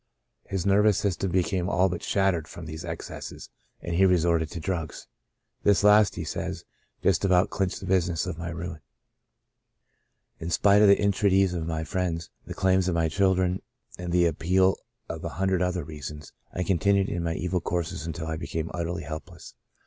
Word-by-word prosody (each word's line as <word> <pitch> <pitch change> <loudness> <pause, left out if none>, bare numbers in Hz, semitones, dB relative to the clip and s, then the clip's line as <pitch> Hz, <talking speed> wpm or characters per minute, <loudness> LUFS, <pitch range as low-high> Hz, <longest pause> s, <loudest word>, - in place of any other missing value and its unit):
His 95 -3 -2
nervous 100 0 +4
system 95 -1 -1
became 90 0 0
all 90 0 +3
but 90 -2 -4
shattered 95 -5 +1
from 85 - -9
these 80 0 -7
excesses, - - -7 0.3
and 85 - -4
he 90 +3 +3
re 90 -1 +5
sorted 85 -1 +1
to 85 - -6
drugs. 80 -2 -4 0.3
*' - - -49
This 100 -2 +4
last," 105 -1 +6
he - - -4
says, - - -4 0.4
"just - - +2
about 95 +1 +3
clinched 95 -2 -1
the - - -6
business 90 -3 +1
of 90 -3 -5
my 85 0 -4
ruin. 85 -1 -6 1.6
In 80 - -4
spite 100 +4 +4
of 105 - +7
the 100 - +6
entreaties 95 -2 +3
of 80 -2 -3
friends, 85 -3 -2 0.2
the - - -6
claims 95 -1 +2
of 90 - 0
my 80 -1 +1
children, 95 +1 +1 0.4
and 90 -1 -4
the 90 0 +4
appeal 90 +4 +2 0.3
of - - -6
a - - -2
hundred 95 -1 +1
other 90 -2 0
reasons, 75 0 -8 0.2
I 90 - -2
continued 100 +2 +2
in 85 - -2
my 85 -1 -1
evil 90 +1 -1
courses 85 -2 -3
until 80 0 -4
I 80 0 -3
became 80 -1 -4
utterly 85 +1 -3
helpless. 80 +1 -8
90 Hz, 180 wpm, -26 LUFS, 85-95 Hz, 1.6 s, of